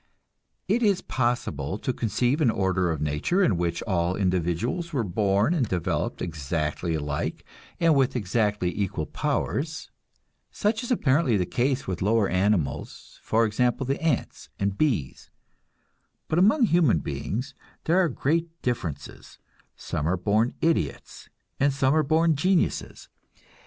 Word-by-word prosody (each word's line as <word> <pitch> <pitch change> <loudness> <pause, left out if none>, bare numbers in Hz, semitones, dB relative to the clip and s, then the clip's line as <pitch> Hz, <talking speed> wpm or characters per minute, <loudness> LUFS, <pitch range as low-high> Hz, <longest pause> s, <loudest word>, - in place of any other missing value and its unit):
It 225 +5 +2
is 205 -5 +2
possible 105 - -1
to 125 - -2
conceive 120 - 0
an 125 - +4
order 95 -4 +1
of 80 -3 -2
nature 75 - +1
in 110 - +3
which 85 -1 -2
all 90 -3 0
individuals 95 - -1
were 135 -7 0
born 100 - +1
and 140 -9 +1
developed 90 -3 -2
exactly 80 +1 -2
alike 75 -1 -3 0.3
and 165 -2 +4
with 135 -2 +2
exactly 105 -4 0
equal 95 -6 -2
powers. 155 - -2 0.6
Such 215 +2 -1
is 245 - -6
apparently 145 - +2
the 90 - 0
case 130 +7 0
with 95 -3 -4
lower 105 +1 +2
animals, 90 -6 -1
for 115 +1 +2
example 120 +4 0
the 135 +3 -2
ants 160 -6 -2
and 100 0 0
the - - -10
bees. 110 - -1 1.0
But 160 - +1
among 220 +9 +4
human 170 - +4
beings 125 - -4 0.3
there 170 +4 +3
are 180 -3 +3
great 165 +5 -1
differences; 85 - -4 0.4
some 75 0 -3
are 95 +2 +1
born 105 +6 +1
idiots 160 - -1 0.3
and 140 +1 +3
some 135 0 +2
are 155 - +4
born 160 +2 +2
geniuses. 180 +5 0
115 Hz, 140 wpm, -26 LUFS, -, 1.0 s, an